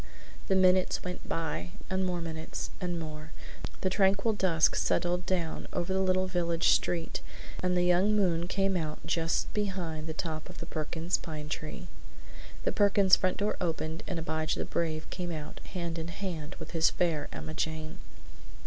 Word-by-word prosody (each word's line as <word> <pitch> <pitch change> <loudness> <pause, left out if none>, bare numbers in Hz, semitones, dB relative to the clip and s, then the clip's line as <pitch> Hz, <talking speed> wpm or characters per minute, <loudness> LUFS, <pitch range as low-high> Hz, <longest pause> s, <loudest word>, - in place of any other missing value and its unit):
The 190 - +3
minutes 185 0 +4
went 180 0 -5
by, 150 - -2
and 190 0 0
more 180 -2 0
minutes, 160 -1 -4
and 175 -2 -1
more. 155 -1 -6 0.5
The 190 - +2
tranquil 195 +3 +3
dusk 170 -6 +4
settled 175 +1 +1
down 175 -4 -1
over 175 +2 -1
the 190 - +2
little 185 0 +3
village 170 -2 +2
street 170 -2 +2 0.4
and 180 0 +2
the 175 - +4
young 180 +4 +4
moon 175 -4 +2
came 195 +1 +1
out 155 -3 -3
just 165 -1 0
behind 180 -7 -2
the 160 - -3
top 160 -1 -3
of 180 - -10
the - - -5
Perkins 165 +2 -1
pine 155 -3 -6
tree. 155 +4 -4 0.8
The - - +2
Perkins 200 -2 +6
front 185 -1 0
door 205 +1 +1
opened 160 -1 -1
and 180 - -2
Abijah 160 -1 -1
the - - -1
Brave 160 -2 -1
came 175 -2 -3
out 155 -2 -6
hand 170 -3 -3
in 160 - -3
hand 170 -4 -4
with - - -8
his 165 -2 +4
Fair 160 -4 0
Emma 155 0 -6
Jane. 155 -1 -3
170 Hz, 170 wpm, -31 LUFS, 160-185 Hz, 0.8 s, Perkins